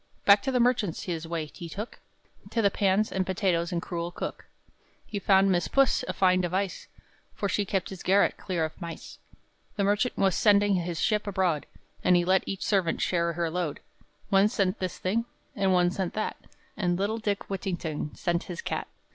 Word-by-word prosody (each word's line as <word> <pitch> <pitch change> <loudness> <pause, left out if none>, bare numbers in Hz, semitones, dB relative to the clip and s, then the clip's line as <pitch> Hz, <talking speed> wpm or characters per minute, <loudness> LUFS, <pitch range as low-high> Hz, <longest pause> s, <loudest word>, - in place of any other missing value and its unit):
Back 200 0 +7
to 265 - -1
the 250 - +2
merchant's 235 -8 +1
his 165 -3 -4
way 165 -2 -2
he 170 - -8
took, 210 +7 -7 0.5
To 230 - 0
the 200 - +4
pans 200 +2 +2
and 190 - 0
potatoes 180 -2 0
and 170 -1 -2
cruel 170 -2 -3
cook, - - -6 0.3
And - - -41 0.3
he 205 - -4
found 195 0 +4
Miss 175 -1 +1
Puss 275 -1 +3
a - - -2
fine 185 -1 +3
device, 185 +1 -2 0.5
For 200 - -1
she 205 +1 0
kept 195 -1 -2
his 190 - -8
garret 195 +2 +3
clear 175 -4 -2
of 155 - -9
mice. 170 -1 -8 0.6
The 200 - 0
merchant 205 +5 +1
was 195 -2 +3
sending 205 -1 +4
his 175 -2 -1
ship 210 -1 +1
abroad, 185 -6 0 0.4
And 180 - +5
he 175 0 +3
let 190 +1 +4
each 195 - -3
servant 190 -5 +1
share 170 -1 +1
her 165 -1 -1
load; 175 -4 -2 0.5
One 195 0 +5
sent 200 -3 0
this 185 -1 -3
thing, 225 +5 0 0.3
and 195 -3 +2
one 180 -1 +4
sent 185 -1 -3
that, 215 - -2 0.4
And 175 -3 0
little 205 +4 -1
Dick 205 -2 -2
Whittington 175 -6 -3
sent 170 -1 -1
his 175 -2 -6
cat. - - -3
190 Hz, 195 wpm, -28 LUFS, 175-200 Hz, 0.6 s, Back